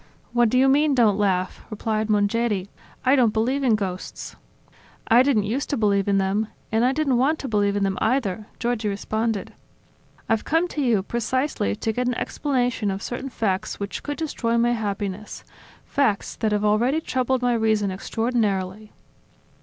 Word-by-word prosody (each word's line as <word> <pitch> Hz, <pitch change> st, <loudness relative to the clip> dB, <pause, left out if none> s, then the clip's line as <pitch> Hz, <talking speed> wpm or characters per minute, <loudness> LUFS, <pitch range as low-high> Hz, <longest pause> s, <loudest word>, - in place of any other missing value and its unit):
"What 240 Hz, -1 st, +4 dB
do 255 Hz, -, +1 dB
you 265 Hz, +1 st, +5 dB
mean 285 Hz, +1 st, +3 dB
don't 215 Hz, -5 st, +3 dB
laugh?" 185 Hz, -2 st, 0 dB
replied 215 Hz, 0 st, -2 dB
Mongeri. 205 Hz, -1 st, +1 dB, 0.4 s
"I 260 Hz, +2 st, +5 dB
don't 245 Hz, -5 st, +4 dB
believe 255 Hz, +6 st, 0 dB
in 240 Hz, -4 st, +4 dB
ghosts." 185 Hz, -3 st, -5 dB, 0.7 s
"I 235 Hz, +2 st, +6 dB
didn't 260 Hz, -6 st, +3 dB
used 235 Hz, +8 st, -2 dB
to 285 Hz, -, 0 dB
believe 200 Hz, -3 st, +2 dB
in 200 Hz, -1 st, +3 dB
them... 195 Hz, +3 st, 0 dB, 0.2 s
and 225 Hz, +1 st, +2 dB
I 250 Hz, -, +4 dB
didn't 270 Hz, -3 st, +1 dB
want 295 Hz, +5 st, +2 dB
to 275 Hz, -, -5 dB
believe 205 Hz, -3 st, +1 dB
in 205 Hz, -, 0 dB
them, 195 Hz, -1 st, -1 dB
either," 220 Hz, -4 st, 0 dB
Giorgi 235 Hz, -3 st, -1 dB
responded. 215 Hz, +1 st, -2 dB, 0.7 s
"I've 225 Hz, -1 st, +1 dB
come 330 Hz, +3 st, +1 dB
to 300 Hz, -, -3 dB
you 230 Hz, -7 st, +2 dB
precisely 235 Hz, -, -1 dB
to 220 Hz, -, -2 dB
get 250 Hz, +2 st, -1 dB
an 250 Hz, -, 0 dB
explanation 245 Hz, -7 st, -1 dB
of 195 Hz, +1 st, -3 dB
certain 255 Hz, +3 st, -4 dB
facts 215 Hz, -4 st, -2 dB
which 200 Hz, 0 st, -4 dB
could 290 Hz, -1 st, -4 dB
destroy 240 Hz, -7 st, -1 dB
my 235 Hz, +1 st, +3 dB
happiness, 205 Hz, -2 st, -4 dB, 0.4 s
facts 250 Hz, -8 st, 0 dB
that 220 Hz, -2 st, 0 dB
have 210 Hz, 0 st, +1 dB
already 235 Hz, +8 st, +2 dB
troubled 260 Hz, -4 st, -1 dB
my 245 Hz, -1 st, +3 dB
reason 220 Hz, -3 st, +1 dB
extraordinarily." 210 Hz, -1 st, -2 dB
225 Hz, 170 wpm, -23 LUFS, 205-255 Hz, 0.7 s, I